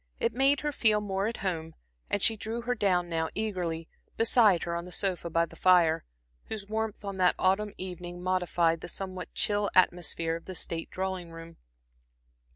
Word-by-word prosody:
It - - +1
made 270 +3 +3
her 295 0 -1
feel 220 -6 +3
more 195 -1 -1
at 230 - -3
home, 160 -3 -2 0.3
and 205 - 0
she 225 - +5
drew 220 +2 -4
her 245 +1 0
down 185 -6 +1
now 165 -1 -1
eagerly, 180 -7 -2 0.3
beside 225 -6 +4
her 170 -1 -2
on 170 0 -3
the 180 - -10
sofa 180 -3 -1
by 165 +1 +2
the - - -15
fire, 170 -3 +4 0.4
whose 215 -2 -5
warmth 220 0 -3
on 200 -1 -4
that 180 -1 +4
autumn 195 +2 +1
evening 180 -1 -7
modified 175 -2 +1
the - - -6
somewhat 185 0 -5
chill 205 -1 +1
atmosphere 175 -2 +2
of 165 - -8
the 185 - -7
state 165 0 -3
drawing 185 -2 -3
room. 165 0 -11
185 Hz, 180 wpm, -29 LUFS, 170-210 Hz, 0.4 s, she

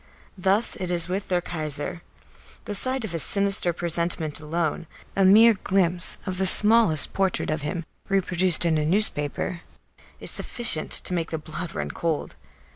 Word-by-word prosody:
Thus 195 +4 +1
it 180 - -5
is 170 -2 +1
with 190 +2 -4
their 180 -1 0
Kaiser. 155 0 -5 0.6
The 210 - -5
sight 255 +4 0
of 205 - -7
his 165 -2 0
sinister 200 -1 +4
presentment 170 -2 -2
alone, 160 +1 -3 0.3
a 195 - +2
mere 220 +4 +6
glimpse 185 -3 0
of 185 -2 -3
the 190 - +1
smallest 210 -7 +3
portrait 190 -5 -1
of 155 0 -3
him 160 +3 -5 0.2
reproduced 185 -3 +1
in 160 -2 +1
a - - -1
newspaper, 170 -2 0 0.6
is - - +4
sufficient 225 -10 0
to - - +1
make 165 -2 -2
the 160 - -4
blood 155 +2 -7
run - - -4
cold. 165 -3 -3
175 Hz, 160 wpm, -24 LUFS, 160-195 Hz, 0.6 s, mere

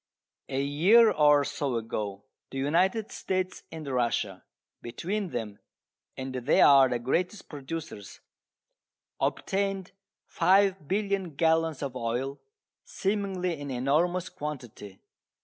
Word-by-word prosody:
A 135 - -1
year 175 +12 +5
or 150 -1 +5
so 140 -2 -2
ago 105 -3 -4 0.3
the 135 - -7
United 180 +10 +1
States 185 -1 -3
and 160 -1 -7
Russia 120 -7 -1 0.4
between 185 - -3
them 110 -7 -5 0.6
(and 130 0 -5
they 130 +3 +1
are 135 -2 +7
the 125 - 0
greatest 175 - -2
producers) 145 -8 -7 1.0
obtained 195 -1 -1 0.4
5,000,000,000 195 -2 +1
gallons 160 -2 +2
of 135 -2 -4
oil, 125 +3 -3 0.4
seemingly 190 -5 -2
an 145 - -6
enormous 155 +8 +1
quantity. 120 -9 -8
150 Hz, 105 wpm, -28 LUFS, 130-185 Hz, 1.0 s, are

